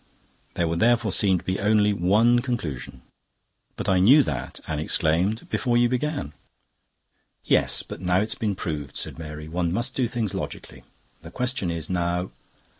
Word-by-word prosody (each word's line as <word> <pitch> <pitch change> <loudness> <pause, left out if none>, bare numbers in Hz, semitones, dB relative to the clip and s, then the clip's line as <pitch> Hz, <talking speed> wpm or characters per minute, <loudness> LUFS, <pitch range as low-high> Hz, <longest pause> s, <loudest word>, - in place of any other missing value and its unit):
"There 85 - +1
would 85 +1 -1
therefore 115 -1 +3
seem 95 -2 +3
to - - -8
be 95 0 -2
only 105 0 +3
one 105 +6 +4
conclusion." 115 - -4 0.7
"But - - -4
I 95 -1 +3
knew 135 +11 +7
that," 65 - -4
Anne 80 -2 -3
exclaimed, 85 +7 0
"before 120 -2 +1
you 120 0 +4
began." 130 - -2 1.1
"Yes, - - +2
but - - -9
now 90 0 +2
it's 110 +2 0
been 105 -3 -2
proved," 75 -8 -5
said - - -3
Mary. 75 -1 -7
"One 85 +1 -1
must 120 +7 -1
do 125 -3 0
things 115 -4 -3
logically. - - -6 0.4
The - - -10
question 125 -7 -1
is 85 -2 -3
now..." 90 0 -1
95 Hz, 165 wpm, -25 LUFS, 85-120 Hz, 1.1 s, knew